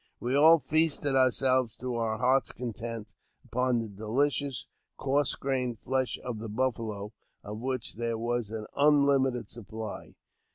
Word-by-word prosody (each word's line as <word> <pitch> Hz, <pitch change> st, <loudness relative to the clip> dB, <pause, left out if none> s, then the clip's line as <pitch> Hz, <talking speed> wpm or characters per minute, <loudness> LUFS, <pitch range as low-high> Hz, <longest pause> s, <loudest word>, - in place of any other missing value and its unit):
We 125 Hz, +3 st, -1 dB
all 160 Hz, +3 st, +7 dB
feasted 150 Hz, -1 st, +2 dB
ourselves 130 Hz, -2 st, +3 dB
to 125 Hz, 0 st, -4 dB
our 115 Hz, -2 st, -1 dB
hearts' 130 Hz, +3 st, +2 dB
content 115 Hz, -2 st, -6 dB, 0.3 s
upon 125 Hz, 0 st, 0 dB
the 115 Hz, -1 st, -2 dB
delicious, 130 Hz, +6 st, -1 dB, 0.3 s
coarse 140 Hz, +1 st, +1 dB
grained 130 Hz, -3 st, -2 dB
flesh 130 Hz, 0 st, -1 dB
of 120 Hz, -3 st, -4 dB
the 110 Hz, 0 st, -6 dB
buffalo, 110 Hz, -3 st, -2 dB, 0.3 s
of 105 Hz, +1 st, -7 dB
which 130 Hz, -1 st, -3 dB
there 115 Hz, -1 st, -2 dB
was 120 Hz, -1 st, -2 dB
an 110 Hz, -1 st, -5 dB
unlimited 140 Hz, -5 st, +3 dB
supply. 110 Hz, -1 st, -7 dB
125 Hz, 135 wpm, -29 LUFS, 115-135 Hz, 0.3 s, all